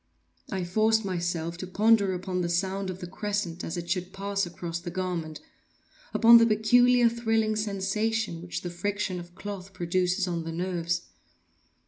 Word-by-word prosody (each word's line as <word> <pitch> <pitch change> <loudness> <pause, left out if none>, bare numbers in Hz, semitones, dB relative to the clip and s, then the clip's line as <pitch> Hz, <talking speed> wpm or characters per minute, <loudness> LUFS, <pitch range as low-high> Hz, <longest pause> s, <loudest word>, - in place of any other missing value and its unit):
I 190 -1 -1
forced 220 +4 +2
myself 170 -2 -2
to 185 - -5
ponder 205 0 +3
upon 180 0 -3
the 170 - -1
sound 190 +2 -1
of 185 0 -6
the - - -4
crescent 190 -2 -3
as 165 - -4
it 170 0 -5
should 180 +1 -2
pass 200 0 -2
across 170 -1 -5
the 175 +1 -6
garment—upon 185 - +1
the 230 - +5
peculiar 245 +3 +5
thrilling 225 -2 +1
sensation 210 -2 -1
which 175 0 -5
the 175 - -4
friction 195 +1 -2
of 175 0 -11
cloth 200 -1 -7
produces 180 +2 0
on 170 -2 -2
the 165 - -5
nerves. 175 0 -2
185 Hz, 155 wpm, -27 LUFS, 175-215 Hz, -, the